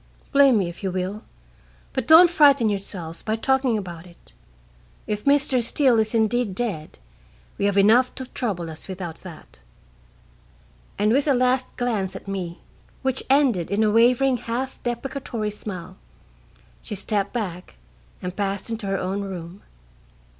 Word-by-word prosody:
Blame 275 -4 +6
me 190 -4 +1
if 170 - -9
you 195 - -1
will, 185 +3 -3 0.7
but 260 -4 -2
don't 325 +3 +9
frighten 280 -8 +5
yourselves 185 -5 -4
by 220 - -1
talking 260 0 +1
about 175 -3 -7
it. 170 - -20 0.7
If 210 0 -4
Mr. 280 -3 +3
Steele 245 0 +2
is 220 +1 0
indeed 220 -2 +1
dead, 195 -10 -4 0.6
we - - +1
have 200 -1 +1
enough 230 +6 +4
to 260 - -5
trouble 190 -10 -4
us 155 - -8
without 180 -4 -6
that." 155 - -13 1.4
And 210 +2 +2
with 275 +5 +2
a 280 - +4
last 255 +1 +2
glance 210 -6 -1
at 190 - -9
me, 185 -3 -5 0.4
which 265 -1 0
ended 260 - +3
in 200 +3 +1
a 215 - +3
wavering 250 +3 +4
half 245 +4 -4
deprecatory 240 -3 -3
smile, 185 -3 -8 0.8
she - - -5
stepped 200 0 -1
back 180 - -5 0.5
and 180 0 -4
passed 200 +2 -3
into 220 -3 -4
her 195 0 0
own 190 +2 -2
room. 185 -1 -7
210 Hz, 150 wpm, -23 LUFS, 190-250 Hz, 1.4 s, don't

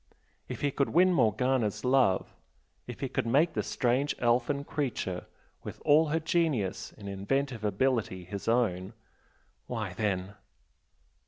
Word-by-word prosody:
If - - -6
he 145 - +1
could 140 0 0
win 180 +3 +4
Morgana's 115 - +1
love 125 -7 +2 0.5
if - - -8
he - - -1
could - - -2
make 150 +8 +3
the 105 - 0
strange 125 +6 0
elfin 125 +4 +1
creature 125 - -3 0.3
with - - -8
all 155 +2 +5
her 160 +2 0
genius 155 - 0
and 100 - -9
inventive 115 +5 -2
ability 105 -3 0
his 100 +2 -7
own, 110 -6 +1 0.7
why 110 -6 -4
then! 95 -1 -2
120 Hz, 135 wpm, -29 LUFS, 100-140 Hz, 0.7 s, all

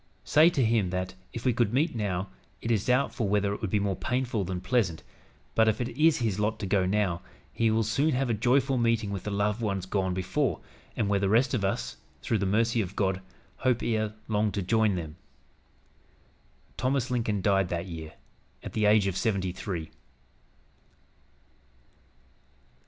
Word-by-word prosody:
Say 155 +3 +6
to 135 -8 +1
him 110 -4 +2
that, 90 0 -3 0.2
if 115 - -7
we 125 - +3
could 115 -2 +1
meet 155 +6 +2
now, 100 -4 -2 0.3
it 115 - -2
is 105 -4 +1
doubtful 125 -3 +1
whether 100 0 +1
it - - -6
would 110 - -2
be 105 - +2
more 100 -1 0
painful 125 -3 -1
than 90 0 -3
pleasant, 95 -4 0 0.5
but 110 0 +4
if 110 - +2
it 120 -1 -2
is 155 +6 +3
his 110 -5 -1
lot 110 +1 0
to 105 - -4
go 95 -1 +2
now, 95 -3 0 0.3
he 115 -1 +2
will 110 +1 +2
soon 125 +8 +1
have 130 +1 +1
a 120 - +1
joyful 130 +4 +2
meeting 115 -3 +1
with 100 -3 -5
the - - -2
loved 105 +2 0
ones 100 -4 -1
gone 95 -1 -1
before, 95 - 0 0.4
and 110 - +1
where 100 0 +2
the 100 -1 +1
rest 120 +5 +3
of 115 -6 0
us, - - -2 0.3
through 110 - 0
the 100 - 0
mercy 115 +3 +2
of 95 -1 -5
God, 95 -2 0 0.4
hope 125 -2 +1
ere 110 -2 -1
long 105 -1 +1
to 100 -1 -2
join 110 +1 +2
them." 80 -2 -6 1.6
Thomas 130 0 0
Lincoln 110 -5 0
died 95 -3 +2
that 85 0 -2
year, 80 -3 -7 0.5
at - - -7
the 110 -1 +1
age 105 -1 +5
of 95 -3 -1
seventy 95 -4 0
three. 85 -3 -5
105 Hz, 185 wpm, -28 LUFS, 95-115 Hz, 1.6 s, Say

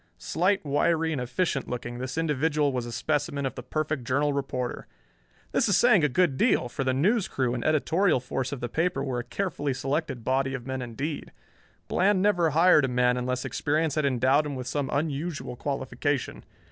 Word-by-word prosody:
Slight, 185 +1 0
wiry 160 +3 +1
and 145 -5 -2
efficient 135 +3 -1
looking, 120 0 -5
this 130 +3 -5
individual 150 -2 +1
was 125 -2 -2
a - - -6
specimen 145 +1 -1
of 135 - -2
the - - -7
perfect 155 +1 -2
Journal 140 +4 +1
reporter. 130 -3 -3 0.6
This - - +2
is 195 - +4
saying 210 -4 +5
a 150 - +3
good 145 0 +2
deal, 125 - +2
for 135 - -3
the 130 - +1
news 190 - +2
crew 125 -3 -1
and 120 - -3
editorial 160 +2 +2
force 130 +1 -3
of 140 - -5
the 120 - -2
paper 160 +1 -1
were 130 -3 -2
a - - -4
carefully 145 -8 -2
selected 135 -2 -2
body 135 +1 0
of 120 -3 -7
men 130 0 -3
indeed. 135 +6 -5 0.6
Bland 195 +1 +2
never 185 -4 +3
hired 160 -1 +5
a - - 0
man 125 -1 +2
unless 125 +1 -2
experience 145 +4 0
had 155 -1 0
endowed 135 +3 +2
him 145 - -4
with 130 -1 -5
some 140 0 -2
unusual 145 -1 -2
qualification. 140 +1 -3
140 Hz, 190 wpm, -27 LUFS, 130-160 Hz, 0.6 s, saying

